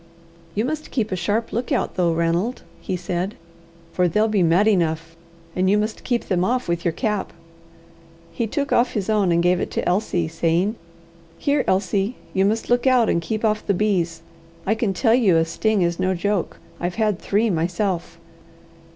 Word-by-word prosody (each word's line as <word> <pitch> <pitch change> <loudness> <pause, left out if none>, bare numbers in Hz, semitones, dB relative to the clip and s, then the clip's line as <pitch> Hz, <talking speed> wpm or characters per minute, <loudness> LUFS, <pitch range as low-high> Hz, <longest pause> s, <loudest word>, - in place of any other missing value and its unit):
"You 215 +3 +1
must 310 +2 -4
keep 220 -5 -1
a - - 0
sharp 205 +6 -1
look 240 +6 -2
out 270 - 0
though, 175 -3 +1
Ranald," 170 +8 0 0.2
he 185 - -3
said; 180 +3 -3 0.6
"for 180 +1 +2
they'll 210 +6 +2
be 210 -3 +1
mad 175 +5 +4
enough, 165 -4 0 0.4
and 185 +1 +2
you 205 - +4
must 215 +1 -2
keep 240 -2 -1
them 180 -2 0
off 250 +6 0
with 170 0 -1
your 170 - +1
cap." 210 +2 -2 1.0
He 230 - -2
took 285 +6 -1
off 240 +1 +3
his 210 0 -1
own, 205 -4 +2
and 170 0 +2
gave 180 0 +3
it - - -2
to - - -2
Elsie, 180 -3 0
saying: 165 +5 +1 0.6
"Here, 285 -1 +1
Elsie: 195 +4 +1 0.2
you 190 0 +2
must 220 +3 0
look 245 +2 +2
out, 250 -3 +4
and 170 - +1
keep 220 +5 -2
off 215 0 +1
the 200 - 0
bees. 175 -5 0 0.4
I 210 - +2
can 220 -2 0
tell 225 +4 +2
you 215 -9 +4
a 165 - +3
sting 200 +4 +1
is 170 0 -1
no 185 0 +1
joke. 195 0 -1 0.2
I've 175 +1 -2
had 215 -4 0
three 210 +2 +1
myself." 175 +1 -1
195 Hz, 190 wpm, -22 LUFS, 175-220 Hz, 1.0 s, mad